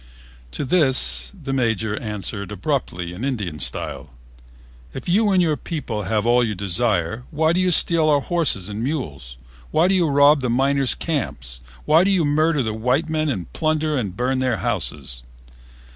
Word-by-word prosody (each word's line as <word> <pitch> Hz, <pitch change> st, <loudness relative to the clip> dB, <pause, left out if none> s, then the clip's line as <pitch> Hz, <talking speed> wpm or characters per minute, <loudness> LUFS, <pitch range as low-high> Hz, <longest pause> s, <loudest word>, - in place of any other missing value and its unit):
To -, -, -3 dB
this 135 Hz, -3 st, +2 dB
the 135 Hz, -3 st, -4 dB
Major 110 Hz, -5 st, 0 dB
answered 105 Hz, -2 st, -4 dB
abruptly 95 Hz, -, -3 dB
in 95 Hz, +7 st, -7 dB
Indian 105 Hz, -, -3 dB
style: 70 Hz, +2 st, -2 dB, 0.9 s
"If -, -, -7 dB
you 205 Hz, +5 st, +3 dB
and 185 Hz, -2 st, +3 dB
your 155 Hz, -3 st, +1 dB
people 125 Hz, -, -5 dB
have 110 Hz, +1 st, 0 dB
all 120 Hz, +1 st, +4 dB
you 110 Hz, -3 st, -2 dB
desire, 100 Hz, +1 st, -1 dB
why 160 Hz, +2 st, +1 dB
do 180 Hz, -, +1 dB
you 185 Hz, 0 st, +2 dB
steal 165 Hz, -2 st, +4 dB
our 145 Hz, -1 st, +4 dB
horses 150 Hz, -, 0 dB
and 105 Hz, +1 st, -5 dB
mules? 75 Hz, -, -4 dB, 0.3 s
Why 165 Hz, +3 st, +3 dB
do 195 Hz, -, +2 dB
you 180 Hz, -3 st, +2 dB
rob 145 Hz, 0 st, +5 dB
the 125 Hz, -, -1 dB
miners' 135 Hz, +2 st, +1 dB
camps? 65 Hz, -, -4 dB, 0.2 s
Why 160 Hz, +3 st, +5 dB
do 195 Hz, -, +2 dB
you 185 Hz, -5 st, +2 dB
murder 150 Hz, 0 st, +2 dB
the 110 Hz, -1 st, -2 dB
white 125 Hz, +8 st, 0 dB
men 155 Hz, -1 st, 0 dB
and 95 Hz, -, -4 dB
plunder 155 Hz, -1 st, 0 dB
and 100 Hz, -8 st, -3 dB
burn 130 Hz, +1 st, 0 dB
their 130 Hz, -1 st, 0 dB
houses?" 75 Hz, -, -2 dB
130 Hz, 175 wpm, -21 LUFS, 105-155 Hz, 0.9 s, rob